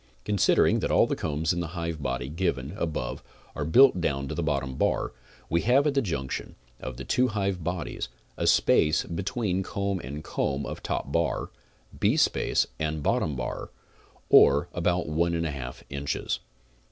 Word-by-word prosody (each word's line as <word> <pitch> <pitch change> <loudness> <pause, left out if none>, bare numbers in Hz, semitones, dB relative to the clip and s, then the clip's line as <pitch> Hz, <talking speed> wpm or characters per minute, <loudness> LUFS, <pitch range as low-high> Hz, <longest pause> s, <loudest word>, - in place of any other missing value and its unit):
Considering 105 -2 +3
that - - -1
all - - +5
the - - -1
combs 80 +1 -1
in 85 - -2
the 85 +1 -5
hive 85 -2 -3
body 65 -2 -2
given 75 -4 -2
above 80 - -3 0.3
are 75 - -2
built 105 - +6
down 70 -4 -1
to - - -4
the - - -2
bottom 70 -4 -1
bar, - - 0 0.3
we 85 +1 +1
have 130 +6 +4
at 150 - +2
the 140 - +2
junction 70 - -4 0.2
of 65 -2 -6
the - - -6
two 125 +1 +2
hive 100 -5 -1
bodies, 90 -5 -3 0.3
a - - -1
space 75 +1 +4
between 95 +2 -2
comb 100 0 -2
and 75 +1 -7
comb 70 +1 -1
of - - -6
top 70 - -3
bar, 85 +2 0 0.4
beespace - - +2
and 80 -1 -2
bottom 75 - +1
bar, - - -4 0.6
or 70 +5 +6
about 90 0 0
one 85 +3 +1
and 85 - 0
one 75 - -2
half 65 -3 -7
inches. 70 0 -2
80 Hz, 170 wpm, -27 LUFS, 70-90 Hz, 0.6 s, built